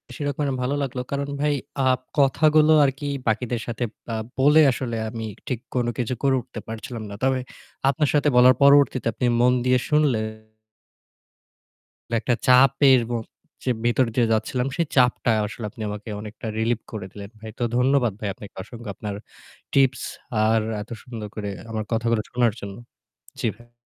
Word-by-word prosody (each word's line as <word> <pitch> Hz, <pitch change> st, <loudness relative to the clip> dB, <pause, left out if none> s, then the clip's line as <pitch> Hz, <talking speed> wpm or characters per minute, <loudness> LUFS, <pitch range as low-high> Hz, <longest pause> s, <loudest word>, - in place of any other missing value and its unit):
সেই 145 Hz, -, -4 dB
রকমের 145 Hz, +1 st, -1 dB
ভালো 130 Hz, +3 st, 0 dB
লাগলো। 125 Hz, -2 st, -3 dB
কারণ 140 Hz, 0 st, -2 dB
ভাই 150 Hz, 0 st, +2 dB, 0.3 s
আ -, -, +2 dB, 0.3 s
কথাগুলো 155 Hz, +3 st, +4 dB
আরকি 140 Hz, +1 st, -1 dB, 0.2 s
বাকিদের 115 Hz, +1 st, 0 dB
সাথে 120 Hz, +1 st, -3 dB, 0.3 s
আ -, -, -1 dB, 0.2 s
বলে 150 Hz, +4 st, +6 dB
আসলে 120 Hz, -2 st, -3 dB
আমি 115 Hz, 0 st, -5 dB, 0.2 s
ঠিক 125 Hz, -4 st, -2 dB, 0.2 s
কোনো 120 Hz, -1 st, +1 dB
কিছু 125 Hz, 0 st, -1 dB
করে 135 Hz, -1 st, +4 dB
উঠতে 115 Hz, -, -9 dB
পারছিলাম 115 Hz, +1 st, -6 dB
না। 100 Hz, -, -7 dB
তবে 130 Hz, -1 st, +2 dB, 0.5 s
আপনার 140 Hz, +1 st, +1 dB
সাথে 150 Hz, 0 st, +3 dB
বলার 125 Hz, +1 st, +7 dB
পরবর্তীতে 140 Hz, -4 st, +5 dB
আপনি 125 Hz, -, -2 dB
মন 125 Hz, +1 st, +5 dB
দিয়ে 125 Hz, 0 st, +4 dB
শুনলে 150 Hz, -6 st, +3 dB, 2.0 s
একটা 120 Hz, -, 0 dB
চাপের 135 Hz, +1 st, +6 dB
ম -, -, -1 dB, 0.5 s
যে -, -, -1 dB, 0.2 s
ভিতরে 120 Hz, 0 st, +2 dB
দিয়ে 120 Hz, -2 st, +3 dB
যাচ্ছিলাম 125 Hz, +4 st, -1 dB
সেই 170 Hz, -, +2 dB
চাপটা 125 Hz, -2 st, +3 dB, 0.2 s
আসলে 110 Hz, +1 st, -6 dB
আপনি 115 Hz, 0 st, -12 dB
আমাকে 105 Hz, +1 st, -7 dB
অনেকটা 110 Hz, +1 st, -8 dB
relief 115 Hz, 0 st, 0 dB
করে 105 Hz, -4 st, -5 dB
দিলেন 100 Hz, -1 st, -9 dB
ভাই। 110 Hz, +1 st, -8 dB
তো -, -, 0 dB
ধন্যবাদ 125 Hz, -3 st, +3 dB
ভাই 105 Hz, -, -3 dB
আপনাকে 100 Hz, +2 st, -12 dB
অসংখ্য 115 Hz, +1 st, -10 dB
আপনার 105 Hz, -2 st, -5 dB, 0.6 s
tips 135 Hz, -2 st, +3 dB, 0.4 s
আর 110 Hz, +1 st, +3 dB, 0.2 s
এত 105 Hz, -, -10 dB
সুন্দর 115 Hz, -4 st, -7 dB
করে 105 Hz, -2 st, -4 dB, 0.2 s
আমার 110 Hz, -1 st, -2 dB
কথাগুলো 115 Hz, -1 st, +1 dB
শোনার 120 Hz, -3 st, +2 dB
জন্য। 100 Hz, -1 st, -7 dB, 0.7 s
জি 120 Hz, -, +1 dB
ভা 120 Hz, 0 st, -20 dB
125 Hz, 165 wpm, -23 LUFS, 110-135 Hz, 2.0 s, বলার